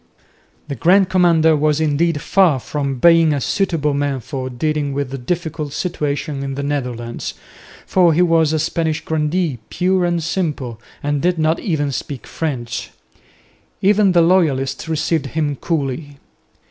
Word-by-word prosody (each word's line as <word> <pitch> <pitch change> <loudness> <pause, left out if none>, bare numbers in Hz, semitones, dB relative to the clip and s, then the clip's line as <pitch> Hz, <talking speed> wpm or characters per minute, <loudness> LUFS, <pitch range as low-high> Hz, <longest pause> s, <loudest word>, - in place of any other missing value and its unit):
The 145 - -4
Grand 180 - +3
Commander 165 -3 +4
was 150 0 +1
indeed 155 0 +1
far 180 -9 +3
from 140 0 -3
being 165 +2 +5
a 145 - 0
suitable 160 -1 0
man 140 -1 -1
for 130 +1 -5
dealing 145 +2 -1
with 140 -1 -3
the 135 - -4
difficult 155 0 -3
situation 150 -4 -2
in 135 -1 -4
the 140 - -4
Netherlands, 125 -5 -4 0.5
for 180 -3 +4
he 170 +3 +3
was 165 -3 +3
a 160 - +1
Spanish 160 0 -1
grandee 155 -2 -1
pure 185 +1 +1
and 175 -1 0
simple 145 - -3 0.2
and 145 -1 0
did 175 0 +1
not 160 +1 +1
even 150 -7 -1
speak 135 0 -5
French. 120 -7 -4 0.9
Even 200 -1 +4
the 170 -1 +5
loyalists 160 -5 +1
received 160 -2 0
him 150 0 -1
coolly. 145 -2 -3
155 Hz, 145 wpm, -19 LUFS, 140-170 Hz, 0.9 s, being